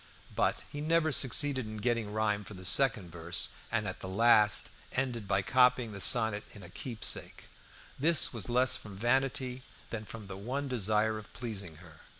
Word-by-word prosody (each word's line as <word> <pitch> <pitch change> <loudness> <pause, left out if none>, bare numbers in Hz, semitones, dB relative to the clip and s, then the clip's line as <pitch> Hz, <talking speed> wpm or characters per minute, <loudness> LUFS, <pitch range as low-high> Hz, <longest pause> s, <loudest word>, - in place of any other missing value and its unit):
But - - 0
he 145 - -6
never 160 0 +2
succeeded 135 -2 +3
in 110 0 -7
getting 115 0 -1
a - - -8
rhyme 105 -1 -1
for 100 - -11
the 95 0 -9
second 115 - +3
verse; 85 0 -1 0.2
and 110 -3 -1
at 95 - -6
last 105 +2 +4 0.2
ended 125 -5 -2
by 95 0 +1
copying 125 -1 +3
a 100 - -8
sonnet 110 -1 +3
in 100 - -11
a 85 - -11
"Keepsake." 115 +3 -4 0.6
This 160 0 +4
was 110 -6 -1
less 125 +2 +4
from 105 -3 -9
vanity 130 +2 0 0.3
than 110 -2 -5
from 110 0 -9
the 95 -1 -8
one 130 +8 -4
desire 110 -2 0
of 105 - -14
pleasing 100 -9 -7
her. 80 -1 -16
110 Hz, 175 wpm, -31 LUFS, 100-125 Hz, 0.6 s, last